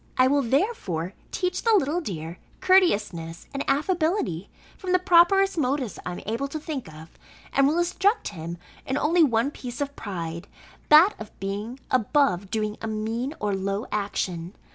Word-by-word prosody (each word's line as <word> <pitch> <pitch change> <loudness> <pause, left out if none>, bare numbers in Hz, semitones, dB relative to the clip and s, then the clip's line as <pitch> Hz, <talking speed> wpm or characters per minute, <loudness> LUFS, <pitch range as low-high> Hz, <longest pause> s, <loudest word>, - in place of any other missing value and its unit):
I 255 - +6
will 280 +2 +3
therefore 230 - -1 0.2
teach 365 -1 -2
the 455 -2 +4
little 330 -1 +1
dear 170 - -6 0.2
courteousness 210 - +2
and 275 - -2
affability, 310 - 0 0.3
from 370 -1 -3
the - - +7
properest 365 +1 +4
motives 255 - -1
I 180 - -4
am - - -7
able 230 +6 -2
to 310 +3 -5
think 285 - -5
of; 155 +1 -14 0.3
and 275 0 +4
will 305 +4 +1
instruct 385 +5 +1
him 170 -2 -7 0.3
in 265 - 0
only 335 +4 +3
one 240 -1 +2
piece 245 -4 -8
of 285 0 -3
pride, 170 -4 -5 0.4
that 320 +7 +8
of 220 - -10
being 205 +6 -4
above 225 - +2
doing 215 -1 -2
a 225 - -3
mean 225 +6 -3
or 205 -1 -1
low 195 +2 -2
action. 195 -3 -3
250 Hz, 165 wpm, -25 LUFS, 195-315 Hz, 0.4 s, that